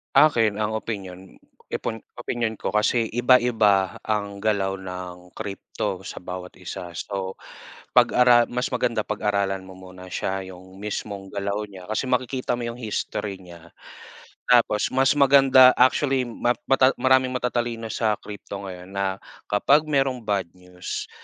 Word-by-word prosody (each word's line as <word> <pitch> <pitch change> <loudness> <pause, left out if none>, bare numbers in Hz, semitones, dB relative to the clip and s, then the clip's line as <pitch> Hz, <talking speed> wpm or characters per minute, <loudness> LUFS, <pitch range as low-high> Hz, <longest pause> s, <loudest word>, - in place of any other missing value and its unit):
Akin, 120 -8 +5
ang 105 0 -1
opinyon 95 -4 -6 0.3
ipon 115 - -4 0.2
opinyon 120 -2 -2
ko 95 - -4
kasi 110 +2 +1
iba-iba 115 -6 +3
ang 100 -2 -2
galaw 100 -2 0
ng 90 -1 -8
crypto 100 -1 -4
sa 95 -1 -9
bawat 90 0 -7
isa, 85 -1 -8
so 95 +1 -4 0.6
pag-ara 120 -1 +5
mas 125 +1 -2
maganda 115 -3 0
pag-aralan 100 -3 -1
mo 95 - -11
muna 95 0 -12
siya, 95 +1 -3
yung 95 +1 -13
mismong 100 -1 -5
galaw 100 +1 -3
niya. 95 -2 -12
Kasi 110 +5 -1
makikita 125 0 -1
mo 120 - -5
yung 115 +1 -5
history 105 -3 -3
niya. 85 -3 -14 0.8
Tapos 115 -3 +3
mas 135 +2 +3
maganda, 135 -2 +7
actually, 130 +1 +3
ma 120 +1 0 0.2
mata 135 0 +5
maraming 130 0 +3
matatalino 120 -2 -2
sa 110 0 +1
crypto 100 -1 -8
ngayon 90 +1 -10
na 95 -1 -1 0.3
kapag 140 +9 +4
merong 135 -3 +1
bad 100 -4 -1
news, 90 0 -7
105 Hz, 140 wpm, -24 LUFS, 95-120 Hz, 0.8 s, maganda